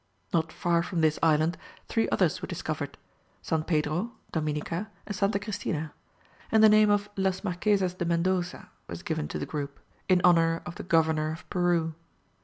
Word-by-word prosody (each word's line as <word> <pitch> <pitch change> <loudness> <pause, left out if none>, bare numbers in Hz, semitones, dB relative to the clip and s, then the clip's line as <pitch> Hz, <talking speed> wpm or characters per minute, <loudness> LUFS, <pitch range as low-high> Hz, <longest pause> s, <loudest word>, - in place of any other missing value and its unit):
Not 165 -1 +1
far 170 -1 +1
from 170 -1 -2
this 155 -1 +2
island 160 +1 +3 0.3
three 225 - +1
others - - +1
were - - -4
discovered, - - -4 0.5
San 160 -2 0
Pedro, 160 +7 0 0.2
Dominica, 160 +5 -2 0.2
and 205 - -5
Santa 200 +2 +1
Christina, 165 -7 -3 0.6
and 220 0 +5
the 220 - +9
name 215 0 +6
of 205 0 +2
las 190 -1 0
Marquezas 185 0 +1
de 180 -1 -3
Mendoça 175 +1 0 0.2
was - - -7
given 75 - -2
to 75 - -4
the 75 - -3
group, 140 -2 -5 0.3
in 185 -1 +5
honour 165 -2 +4
of 175 - -6
the - - -7
governor 160 -2 +2
of 160 - -9
Peru. 175 -3 +1
170 Hz, 170 wpm, -28 LUFS, 160-190 Hz, 0.6 s, the